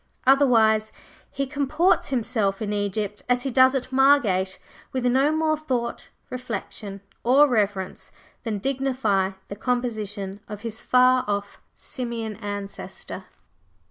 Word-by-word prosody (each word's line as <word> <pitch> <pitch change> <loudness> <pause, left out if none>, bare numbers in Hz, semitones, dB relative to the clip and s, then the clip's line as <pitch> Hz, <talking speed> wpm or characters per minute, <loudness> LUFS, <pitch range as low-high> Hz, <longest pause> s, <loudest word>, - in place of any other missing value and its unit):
Otherwise 225 -5 +4 0.4
he 275 - -2
comports 300 +6 +1
himself 225 -6 0
in 210 -1 -2
Egypt 205 0 -2
as 245 0 +2
he 270 - -2
does 260 +2 +5
at 260 0 -3
Margate, 235 -9 +3 0.3
with 255 -1 -2
no 265 +4 +3
more 315 0 +2
thought, 255 -6 -3 0.2
reflection, 215 -5 -5 0.2
or 270 +5 +6
reverence 205 -6 -1 0.3
than 220 -3 -2
dignify 250 -6 0
the 200 - -6
composition 210 -5 -3
of 210 -1 -7
his 225 -1 -5
far 255 0 +4
off 200 0 -3
Simian 235 -4 -4
ancestor. 205 -2 -6
235 Hz, 120 wpm, -24 LUFS, 205-265 Hz, 0.4 s, or